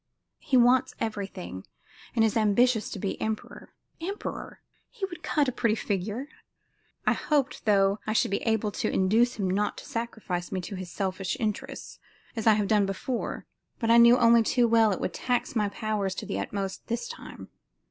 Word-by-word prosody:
He 270 -4 +1
wants 245 +1 +4
everything, 195 - -5 0.5
and 225 -1 +4
is 220 - 0
ambitious 225 +1 +3
to - - -6
be 195 0 -4
emperor. 220 0 -4 0.3
Emperor! 390 +5 -5 0.3
He 440 -6 -4
would 350 -3 -9
cut 295 -3 +1
a - - +1
pretty 230 -2 +1
figure! 210 +6 -3 0.8
I - - +4
hoped, 285 -4 -1
though, 200 -1 +3
I 215 - 0
should 220 - +2
be 200 - 0
able 220 -2 0
to - - -2
induce 225 +6 +3
him 200 -4 -1
not 200 +3 0
to - - -9
sacrifice 225 -8 -4
me 190 - -1
to 190 - -7
his 185 -1 -6
selfish 190 0 -2
interests, 260 +5 -4 0.4
as 225 -1 -2
I 220 - +8
have 210 -1 +1
done 210 -2 +3
before, 230 +6 -3 0.3
but 230 -2 +1
I 235 - +7
knew 235 +1 +8
only 235 -1 +6
too 240 +2 +2
well 225 -2 +4
it 190 - -2
would 180 - -2
tax 250 0 -1
my 210 -2 +1
powers 200 -2 -2
to - - -5
the - - -3
utmost 195 -1 -4
this 235 0 -2
time. - - -10
220 Hz, 185 wpm, -27 LUFS, 200-240 Hz, 0.8 s, I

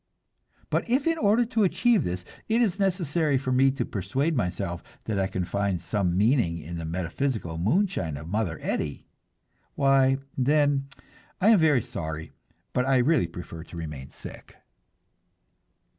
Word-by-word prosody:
But - - 0
if 260 +3 +2
in 330 -1 +1
order 220 +4 +3
to 225 -2 +1
achieve 230 +3 +3
this, 90 0 -3 0.2
it 225 +2 +3
is 210 -5 +1
necessary 170 -6 +1
for 130 0 -2
me 130 +1 +5
to 135 +2 -2
persuade 130 - -1
myself 90 -5 -2 0.2
that 105 -3 -2
I 95 - +1
can 95 -2 -3
find 100 -1 -1
some 90 +1 -1
meaning 105 -5 +3
in 85 +1 -6
the 80 - -5
metaphysical 90 - -2
moonshine 115 - 0
of 75 +3 -8
Mother 95 -4 -1
Eddy 75 -3 -3 0.7
why, 135 -1 +4 0.2
then, 140 +1 +2 0.5
I 200 - +4
am 220 -4 +7
very 150 -7 +4
sorry, 80 0 -5 0.4
but 125 - +2
I 135 -1 +4
really 130 - +3
prefer 85 -1 -8
to 85 - -10
remain 75 -5 -6
sick. - - -11
125 Hz, 155 wpm, -26 LUFS, -, 0.7 s, am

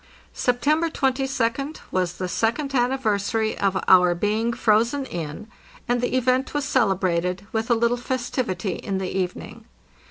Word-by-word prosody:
September 300 +7 +1
22d 270 0 -1
was 180 -2 0
the 185 0 -4
second 235 +9 -1
anniversary 225 -4 0
of 195 -1 +1
our 180 -1 +6
being 215 +5 0
frozen 235 +5 +2
in, 170 - -6 0.4
and 245 0 +1
the 245 +1 0
event 255 +2 +1
was 290 -2 0
celebrated 185 -7 +1
with 225 +1 -2
a 235 - +5
little 235 +1 +1
festivity 240 -7 -2
in 195 -1 -3
the 190 -1 -4
evening. 185 -2 -4
230 Hz, 135 wpm, -23 LUFS, 190-255 Hz, 0.4 s, our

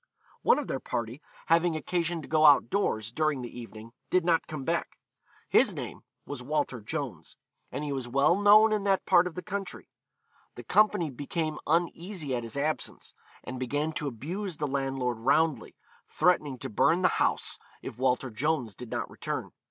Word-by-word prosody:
One - - +4
of 295 - -2
their 135 - -2
party, 120 +4 -4 0.2
having 165 0 +3
occasion 170 0 -1
to - - -10
go 155 0 +2
out 140 -5 +6
doors 110 - 0
during 155 -1 0
the 120 0 -8
evening, 115 -1 -10 0.2
did 180 -2 +2
not 170 -2 +2
come 155 -4 -5
back; - - -2 0.5
his - - +4
name - - -6 0.2
was 140 -3 -6
Walter 140 -3 -2
Jones, 115 - -5 0.4
and 150 - -4
he 145 - -3
was 130 -3 -3
well 140 +7 +3
known 210 +2 +6
in 210 -2 0
that 195 -1 +2
part 175 +1 +5
of 180 - -8
the 180 - -5
country. 200 -1 -6 0.6
The - - -9
company 210 -7 +3
became 155 +4 -3
uneasy 170 -2 -1
at 120 - -2
his 115 +2 -7
absence, 155 +2 -3 0.3
and 130 - -6
began 145 +5 -1
to 150 - -2
abuse 165 - -4
the 150 - -1
landlord 135 -4 -1
roundly, 150 +5 +1 0.3
threatening 150 -7 +2
to - - -5
burn 165 - +3
the - - +7
house - - +1 0.2
if 120 - -7
Walter 130 0 +1
Jones 125 -1 -1
did 125 +3 -9
not - - -3
return. - - -5
150 Hz, 175 wpm, -28 LUFS, 125-170 Hz, 0.6 s, the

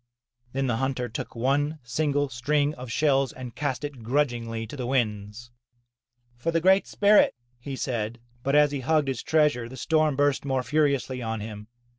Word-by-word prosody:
Then 135 +1 0
the 120 -3 0
hunter 130 -1 -1
took 115 - -6
one 145 +6 +1
single 145 +4 0
string 145 +4 0
of 125 -4 -8
shells 135 0 +2
and 125 -2 -8
cast 145 -2 -2
it 145 -4 -6
grudgingly 115 -3 -1
to 115 - -9
the 125 -3 -4
winds. 110 -2 -2 0.9
'Tor 165 - 0
the 165 - +3
Great 190 +3 +4
Spirit," 205 0 +4 0.2
he 135 +2 -6
said. 120 -3 -3 0.2
But 140 +3 0
as 150 -1 +5
he 140 - -2
hugged 150 +1 +1
his 130 -4 -2
treasure 150 -7 +2
the 130 - -10
storm 155 +1 +2
burst 145 0 +2
more 135 -2 0
furiously 140 -2 0
on 110 -1 -3
him. 105 0 -7
135 Hz, 175 wpm, -26 LUFS, 120-145 Hz, 0.9 s, as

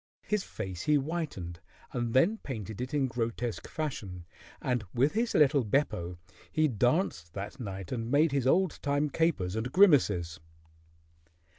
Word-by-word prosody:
His 210 -2 0
face 95 -5 -6
he 150 - +4
whitened 140 - -3 0.3
and 120 -1 -2
then 200 +12 +4
painted 110 -4 -6
it 125 - -4
in 145 -2 +1
grotesque 120 -1 -3
fashion, 100 - -5 0.3
and 125 -3 -1
with 135 +5 +3
his 230 +2 0
little 145 -2 +5
Beppo 100 - 0 0.3
he 155 -1 +3
danced 120 - 0
that 100 +5 -6
night 95 -5 -6
and 115 -2 -3
made 150 +3 +4
his 135 -2 +1
old 180 +3 +2
time 145 +1 0
capers 120 - +1
and 115 +3 -2
grimaces. 105 - +4
125 Hz, 145 wpm, -30 LUFS, 100-150 Hz, 0.3 s, little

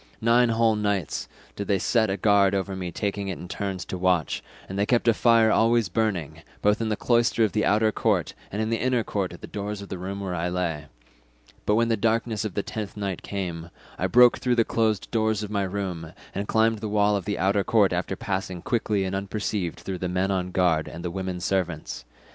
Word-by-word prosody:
Nine 120 +2 +4
whole 115 -1 +3
nights 105 -5 -1 0.3
did 100 - -4
they 100 - +3
set 110 +4 +2
a 95 - -1
guard 100 0 +4
over 95 0 -2
me 90 -2 -4
taking 100 +1 -2
it 95 - -3
in 90 - -8
turns 95 0 -4
to 95 - -5
watch, 90 -3 +1 0.3
and 95 +1 -5
they 100 - +1
kept 120 -1 +2
a 115 - +6
fire 115 -1 +4
always 115 -3 +3
burning, 95 -6 -1 0.2
both 105 +2 +3
in 110 - 0
the 105 - +1
cloister 115 0 +2
of 110 - +2
the 105 - 0
outer 110 +1 +3
court - - 0 0.2
and 105 +2 -1
in 110 - -2
the 115 - 0
inner 125 -1 +1
court 100 -4 -2
at 85 - -11
the - - -6
doors 105 0 -5
of 100 - -9
the 95 - -5
room 95 +2 -5
wherein 90 -3 -3
I 85 +2 -1
lay; 85 -4 -2 0.8
but 105 - +4
when 115 +1 +2
the 115 - +2
darkness 115 0 0
of 105 -4 -4
the 100 - 0
tenth 105 -2 -6
night 100 -3 -3
came, 85 -4 -5 0.3
I - - +1
broke 125 0 +6
through 125 -1 +1
the 115 -1 +3
closed 110 -3 0
doors 110 -2 +1
of 105 - -6
my 100 -1 0
room, 90 -4 -4 0.2
and 100 +1 -3
climbed 110 0 +2
the 110 0 -4
wall 105 0 +3
of 100 - -3
the 100 0 -2
outer 100 +1 +2
court 100 -4 +3
after 90 +2 -2
passing 95 -3 -4
quickly 110 -4 0
and 95 0 -2
unperceived 100 -2 -3
through 95 -2 -5
the 90 - -2
men 95 +2 0
on 90 -1 -1
guard 90 -4 +2
and 85 +1 -8
the 85 - -2
women 95 -1 -4
servants. 90 -9 -2
100 Hz, 230 wpm, -25 LUFS, 95-110 Hz, 0.8 s, a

